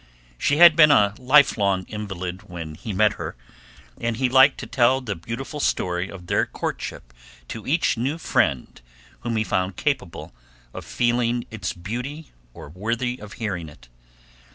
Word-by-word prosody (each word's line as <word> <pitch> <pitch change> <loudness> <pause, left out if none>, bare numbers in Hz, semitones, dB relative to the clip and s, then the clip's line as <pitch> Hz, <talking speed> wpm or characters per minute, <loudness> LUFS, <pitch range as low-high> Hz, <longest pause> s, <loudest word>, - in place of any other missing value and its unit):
She 145 - +1
had 170 -1 +9
been 155 -2 +7
a 100 -8 +4
lifelong 125 -8 +3
invalid 95 -2 -6
when 85 -3 -7
he 105 +8 -7
met 105 +2 +3
her, - - -5 0.6
and 115 -1 -2
he 130 0 +1
liked 135 +2 +6
to - - -6
tell 130 +1 +3
the 115 -7 -4
beautiful 115 - -6
story 90 -8 -1
of 90 -2 -10
their - - +1
courtship - - -6 0.4
to 110 - -7
each 155 -3 +1
new 135 +7 -1
friend 70 - 0 0.4
whom 120 -1 -3
he 110 - +1
found 95 -3 -1
capable 95 - -3 0.4
of - - -8
feeling 120 0 0
its 100 -6 -4
beauty 125 - -6 0.2
or 70 - -11
worthy 115 - -3
of 105 0 -10
hearing 95 -8 -4
it. 60 -4 -18
110 Hz, 155 wpm, -23 LUFS, 95-130 Hz, 0.6 s, had